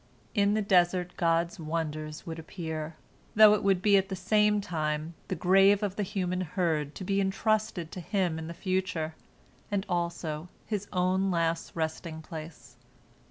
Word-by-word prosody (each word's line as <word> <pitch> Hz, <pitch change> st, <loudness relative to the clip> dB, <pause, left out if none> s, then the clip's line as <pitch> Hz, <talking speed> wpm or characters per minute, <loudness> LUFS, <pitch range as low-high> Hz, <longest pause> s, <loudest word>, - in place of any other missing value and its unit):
In 205 Hz, -1 st, +3 dB
the 215 Hz, -, +1 dB
desert 180 Hz, -2 st, +3 dB
God's 170 Hz, 0 st, +1 dB
wonders 155 Hz, -1 st, -4 dB
would 165 Hz, -1 st, -5 dB
appear, 160 Hz, -2 st, -5 dB, 0.4 s
though 215 Hz, 0 st, +9 dB
it 210 Hz, -, +1 dB
would 195 Hz, -2 st, +2 dB
be 205 Hz, -1 st, +6 dB
at 195 Hz, 0 st, 0 dB
the 190 Hz, -, -2 dB
same 210 Hz, +3 st, +3 dB
time 155 Hz, -3 st, -2 dB
the 185 Hz, -, -2 dB
grave 195 Hz, +4 st, +5 dB
of 200 Hz, -2 st, -1 dB
the 210 Hz, -, -2 dB
human 185 Hz, -2 st, -1 dB
herd 160 Hz, -4 st, -1 dB
to -, -, -6 dB
be 195 Hz, +1 st, +1 dB
entrusted 195 Hz, -3 st, 0 dB
to -, -, -6 dB
him 180 Hz, -2 st, -1 dB
in 160 Hz, -, -6 dB
the 170 Hz, -, -7 dB
future, 185 Hz, -3 st, -1 dB, 0.6 s
and 200 Hz, -1 st, -1 dB
also 170 Hz, -2 st, -2 dB, 0.2 s
his 205 Hz, -2 st, -3 dB
own 185 Hz, +1 st, +1 dB
last 165 Hz, -2 st, -1 dB
resting 160 Hz, 0 st, -3 dB
place. 155 Hz, -7 st, -9 dB
180 Hz, 160 wpm, -29 LUFS, 160-195 Hz, 0.6 s, though